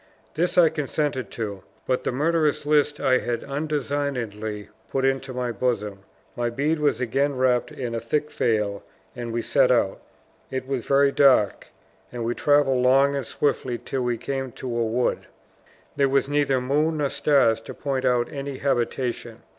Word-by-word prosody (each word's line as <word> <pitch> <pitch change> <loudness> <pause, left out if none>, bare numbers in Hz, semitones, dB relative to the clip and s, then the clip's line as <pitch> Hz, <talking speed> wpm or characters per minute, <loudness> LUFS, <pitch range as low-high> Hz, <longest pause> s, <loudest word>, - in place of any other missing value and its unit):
This 175 +4 -1
I 170 -3 +7
consented 145 -5 -2
to; 100 -4 -4 0.2
but 130 -1 0
the - - -1
murderous 150 +2 +1
list 150 0 +2
I 130 -1 +3
had 120 +1 -3
undesignedly 140 -8 -3 0.2
put 135 0 0
into 135 0 0
my 125 -1 -2
bosom. 105 -3 -2 0.4
My 120 0 -1
bead 145 +6 0
was 150 -1 +1
again 135 +3 0
wrapped 125 -1 +2
in 120 -3 -5
a 115 - -1
thick 150 +7 -2
veil, 105 -3 0 0.3
and 120 -2 -5
we 115 0 -2
set 135 -3 +3
out. 110 -6 +1 0.5
It 130 -1 -4
was 135 -3 -3
very 140 0 +4
dark; 135 -8 +3 0.4
and 120 -2 -4
we 120 - 0
traveled 145 -2 +3
long 135 +3 +4
and 135 -4 -3
swiftly 130 -4 -1
till 130 +3 -4
we 120 -1 0
came 135 +1 -4
to 125 -2 -5
a 120 - +1
wood. 115 +2 -1 0.7
There 140 -1 +2
was 135 0 +2
neither 145 -2 +1
moon 150 +5 +1
nor 145 -2 0
stars 115 -6 +3
to - - -9
point 135 -2 -2
out 120 -1 +2
any 140 -1 -5
habitation. 125 -2 -2
130 Hz, 170 wpm, -24 LUFS, 120-140 Hz, 0.7 s, I